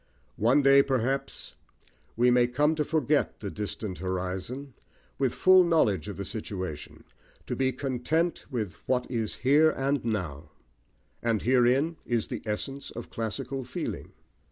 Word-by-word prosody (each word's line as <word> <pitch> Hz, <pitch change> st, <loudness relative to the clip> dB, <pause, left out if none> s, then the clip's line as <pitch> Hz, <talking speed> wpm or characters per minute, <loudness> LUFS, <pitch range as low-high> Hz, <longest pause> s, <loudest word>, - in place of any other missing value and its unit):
One 125 Hz, +7 st, +4 dB
day, 135 Hz, 0 st, +7 dB
perhaps, 135 Hz, +1 st, -2 dB, 0.6 s
we 125 Hz, +1 st, +4 dB
may 120 Hz, 0 st, +4 dB
come 145 Hz, +5 st, +2 dB
to 155 Hz, -1 st, 0 dB
forget 150 Hz, -2 st, +1 dB
the 100 Hz, -2 st, -5 dB
distant 105 Hz, -2 st, -5 dB
horizon, 95 Hz, +9 st, -4 dB, 0.5 s
with 135 Hz, -3 st, +2 dB
full 185 Hz, 0 st, +6 dB
knowledge 110 Hz, -, +2 dB
of 100 Hz, -, -6 dB
the 100 Hz, -, -4 dB
situation, 95 Hz, -8 st, -6 dB, 0.4 s
to -, -, -3 dB
be 130 Hz, 0 st, +1 dB
content 140 Hz, +6 st, -1 dB
with 110 Hz, -9 st, -3 dB
"what 125 Hz, -1 st, +1 dB
is 115 Hz, -4 st, 0 dB
here 150 Hz, +4 st, +6 dB
and 140 Hz, -2 st, -1 dB
now"; 90 Hz, -11 st, -3 dB, 0.7 s
and 115 Hz, -3 st, 0 dB
herein 130 Hz, +6 st, +3 dB
is 120 Hz, -3 st, -1 dB
the -, -, -4 dB
essence 135 Hz, +6 st, -4 dB
of 120 Hz, -, -9 dB
classical 130 Hz, +4 st, -4 dB
feeling. 125 Hz, -, -5 dB
125 Hz, 140 wpm, -28 LUFS, 105-140 Hz, 0.7 s, day